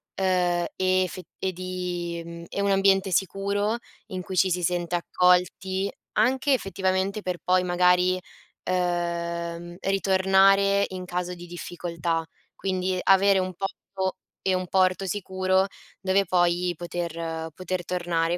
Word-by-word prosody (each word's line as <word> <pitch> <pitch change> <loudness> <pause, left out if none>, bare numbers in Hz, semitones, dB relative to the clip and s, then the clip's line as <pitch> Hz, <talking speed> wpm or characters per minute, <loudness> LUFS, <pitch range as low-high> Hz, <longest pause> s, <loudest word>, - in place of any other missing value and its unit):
ehm, 180 -2 +1
e 185 0 +3
effet 185 -1 -6
e 190 - -1
di 180 -1 -4
mhmm, 170 0 -8
e 200 - -2
un 200 0 +2
ambiente 195 0 +3
sicuro 200 +4 0 0.3
in 185 -1 -5
cui 190 -1 -6
ci 185 +3 +4
si 180 0 0
sente 175 0 0
accolti, 180 +2 +2 0.2
anche 260 +6 +3
effettivamente 195 -2 0
per 180 -2 -3
poi 185 0 +3
magari, 180 +1 +3 0.4
ehm, 170 -1 -2
ritornare 195 +1 +4
in 185 -1 -6
caso 180 0 -3
di 175 0 -10
difficoltà. 170 -1 -3 0.3
Quindi 185 -1 -1
avere 195 0 +5
un 185 0 -2
posto 190 0 -4 0.2
e 190 - +1
un 185 0 -2
porto 185 +1 +2
sicuro 190 -1 +1 0.4
dove 195 +1 +2
poi 175 0 +2
poter 165 -1 -4
poter 185 +1 -4
tornare 175 -1 0
185 Hz, 130 wpm, -26 LUFS, 175-190 Hz, 0.4 s, avere